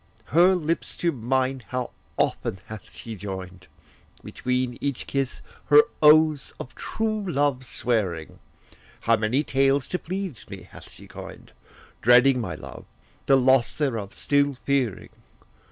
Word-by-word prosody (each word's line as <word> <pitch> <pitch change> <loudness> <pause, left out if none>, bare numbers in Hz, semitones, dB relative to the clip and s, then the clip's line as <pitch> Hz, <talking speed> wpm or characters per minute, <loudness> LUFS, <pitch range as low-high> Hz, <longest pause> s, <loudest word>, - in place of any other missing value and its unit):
Her 180 +4 +6
lips 165 -1 -2
to 170 - 0
mine 130 0 -1
how 125 -1 -3 0.3
often - - 0
hath 110 -1 -10
she 115 -1 -8
joined, 95 -2 -8 0.6
Between 125 -1 -2
each 140 -3 -2
kiss 135 -2 -3 0.2
her 145 0 +7 0.2
oaths 155 -2 +5
of 130 - -8
true 215 -1 -2
love 140 -3 +1
swearing! 100 -11 -2 0.6
How 115 - +3
many 110 +6 0
tales 135 -1 +2
to 180 - -2
please 185 - -5
me - - -9
bath - - -12
she - - -14
coined, - - -11 0.5
Dreading 125 +2 +5
my 115 - -4
love, - - -10 0.4
the 135 - +6
loss 130 -1 +3
thereof 115 -9 -2
still 140 -1 +1
fearing! 135 -7 0
130 Hz, 135 wpm, -25 LUFS, 115-145 Hz, 0.6 s, her